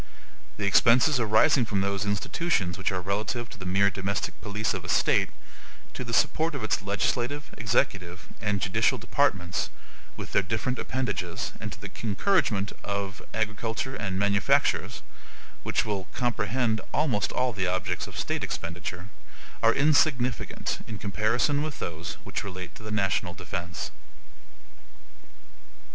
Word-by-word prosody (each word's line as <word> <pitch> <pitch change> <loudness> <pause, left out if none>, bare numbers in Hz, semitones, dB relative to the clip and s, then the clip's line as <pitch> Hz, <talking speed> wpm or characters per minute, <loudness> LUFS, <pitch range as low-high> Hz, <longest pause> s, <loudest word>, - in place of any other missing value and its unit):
The 105 - -1
expenses 125 +7 +5
arising 110 +3 +5
from 100 -2 0
those 100 +1 0
institutions 100 - 0
which 95 - 0
are 95 -1 -1
relative 105 +5 -2
to - - -11
the 95 - -5
mere 100 +2 +4
domestic 95 +1 -2
police 105 +1 -1
of - - -4
a - - -7
state, - - +3 0.6
to - - -4
the 115 - -6
support 155 +6 +2
of 135 - -4
its 110 - +1
legislative, 120 +8 -1
executive, 100 -5 0
and 105 -1 +1
judicial 95 - +2
departments, 90 -1 +1 0.5
with - - -6
their - - +4
different 115 +6 -1
appendages, 110 -10 -2
and 105 -1 -4
to - - -11
the 105 -2 -8
encouragement 110 - +2
of 100 -1 -3
agriculture 110 +4 -2
and 95 -3 -2
manufactures 100 -9 +2 0.6
(which - - 0
will 100 -3 -2
comprehend 120 -1 0
almost 125 -10 +1
all 125 -1 +1
the 95 -3 0
objects 90 0 -1
of - - -9
state - - -1
expenditure), 85 +3 -4 0.5
are 115 - +6
insignificant 140 -3 +2
in 110 - -5
comparison 115 +8 +1
with 155 -1 -3
those 85 0 -4
which - - -3
relate 95 -2 -6
to - - -13
the 110 - -7
national 95 -3 0
defense. 85 0 -4
105 Hz, 140 wpm, -28 LUFS, 95-120 Hz, 0.6 s, are